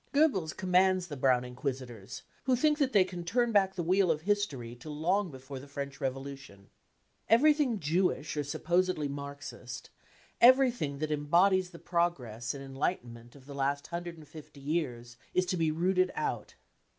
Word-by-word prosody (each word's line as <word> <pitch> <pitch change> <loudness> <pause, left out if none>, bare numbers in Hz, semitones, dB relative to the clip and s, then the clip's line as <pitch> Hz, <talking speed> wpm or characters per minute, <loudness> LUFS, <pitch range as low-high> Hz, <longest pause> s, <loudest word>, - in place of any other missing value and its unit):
Goebbels 275 - +3
commands 185 0 +3
the 145 - -5
Brownr 130 -2 +2
inquisitors, 125 -4 -6 0.2
who 260 -1 +3
think 300 +4 +2
that 275 -3 +2
they 200 -5 +6
can 180 -1 -7
turn 235 +7 +1
back 195 -3 +3
the 175 - -2
wheel 185 +2 +3
of 155 -1 +1
history 160 - -1
to 125 +6 -10
long 175 +6 0
before 130 -1 -9
the 140 - -12
French 140 -1 -6
Revolution. 135 -6 -6 0.6
Everything 270 0 +4
Jewish 165 -1 0
or 150 - -1
supposedly 175 +2 0
Marxist, 140 -3 -7 0.5
everything 245 - +5
that 155 +1 -3
embodies 180 +6 +3
the 175 - -12
progress 140 -11 -1
and 135 - -7
en 135 0 -10
lightenment 120 -5 -3
of 135 -2 -16
the 140 - -9
last 140 +1 -1
hundred 170 0 -5
and 155 -2 -13
fifty 150 -2 -12
years, 130 -6 -3 0.2
is 185 - +3
to 180 - -1
be 165 -2 +1
rooted 185 +3 +2
out. - - -3
155 Hz, 165 wpm, -30 LUFS, 135-185 Hz, 0.6 s, they